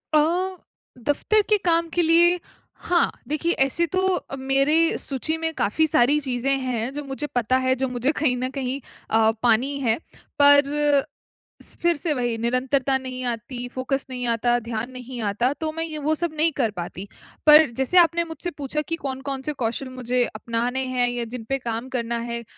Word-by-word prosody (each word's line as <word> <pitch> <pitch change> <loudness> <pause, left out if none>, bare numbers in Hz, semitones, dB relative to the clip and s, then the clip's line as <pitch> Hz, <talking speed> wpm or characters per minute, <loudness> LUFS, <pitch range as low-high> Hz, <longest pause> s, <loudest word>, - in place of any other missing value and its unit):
अ, - - +7 0.8
दफ़्तर 300 - +2
के 425 - +5
काम 335 -1 +2
के 350 - +2
लिए, 345 +2 +5 0.4
हाँ। 350 -1 +1 0.2
देखिए, 310 +3 -1
ऐसे 275 +3 +2
तो 375 0 +2
अ, - - -6
मेरी 275 +5 +2
सूची 300 +4 -1
में 325 0 -2
काफ़ी 315 +6 +1
सारी 295 -1 +3
चीज़ें 270 -1 0
हैं, 240 -1 -2
जो 295 +1 -5
मुझे 275 +2 -5
पता 245 +1 +2
है, 260 0 +1
जो 265 +1 -1
मुझे 250 +3 0
कहीं 295 -5 +1
न 255 +1 -2
कहीं 265 0 -2 0.3
अ, 220 0 +4
पानी 245 +4 +2
है। 230 -5 +1 0.4
पर 285 0 +8 1.0
स - - -8
फ़िर 345 0 +3
से 310 +1 -1
वही, 240 -4 -1
निरंतरता 255 +3 +1
नहीं 255 -1 -5
आती, 245 +1 -4
फ़ोकस 265 +1 -2
नहीं 250 -1 -4
आता, 235 +1 +2
ध्यान 230 0 -5
नहीं 250 -1 -7
आता, 240 +6 +1
तो 310 +1 -4
मैं 325 +1 -3
ये 315 -2 -4
वो 315 - +3
सब 335 0 -2
नहीं 320 +2 +4
कर 235 -6 +1
पाती। 180 +3 -6 0.4
पर 300 -1 +8
जैसे 265 +7 +1
आपने 340 -1 +5
मुझसे 330 +2 -5
पूछा 290 +1 -2
कि 330 +2 -3
कौन-कौन 270 0 -4
से 300 +3 -3
कौशल 235 +4 -2
मुझे 250 -1 0
अपनाने 235 +4 -2
हैं 250 -1 +1
या 245 0 -3
जिन 230 0 -7
पे 270 - +1
काम 235 0 -4
करना 235 0 -2
है, 235 0 -4
265 Hz, 185 wpm, -23 LUFS, 245-305 Hz, 1.0 s, पर